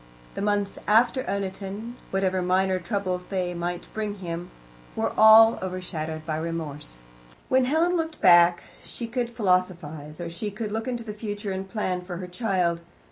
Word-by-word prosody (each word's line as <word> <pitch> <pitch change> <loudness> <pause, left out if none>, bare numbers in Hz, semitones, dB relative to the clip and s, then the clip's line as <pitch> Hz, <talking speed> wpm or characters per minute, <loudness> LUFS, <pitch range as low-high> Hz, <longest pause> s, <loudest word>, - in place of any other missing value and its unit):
The - - -5
months 205 -1 0
after 235 +4 +4
Oniton, 200 +3 -4 0.2
whatever 190 -1 0
minor 185 +1 +2
troubles 185 -1 -2
they 180 -2 -2
might 175 0 -4
bring 210 -2 -3
him, 175 -2 -5 0.5
were - - -1
all 220 +1 +8
overshadowed 165 -4 -4
by 155 -1 -2
Remorse. 155 - -5 0.5
When 260 0 +4
Helen 325 +6 +2
looked 320 -2 -2
back 175 0 +6 0.2
she 235 - -6
could 240 +1 -2
philosophize, 180 -8 -1
or 175 - -4
she 170 +6 -4
could 210 +1 -5
look 225 +3 -3
into 240 -2 -3
the 215 -2 -6
future 205 -1 -4
and 190 0 -4
plan 185 -4 -2
for 180 -1 -6
her 180 - -5
child. 180 -3 0
190 Hz, 160 wpm, -26 LUFS, 175-220 Hz, 0.5 s, all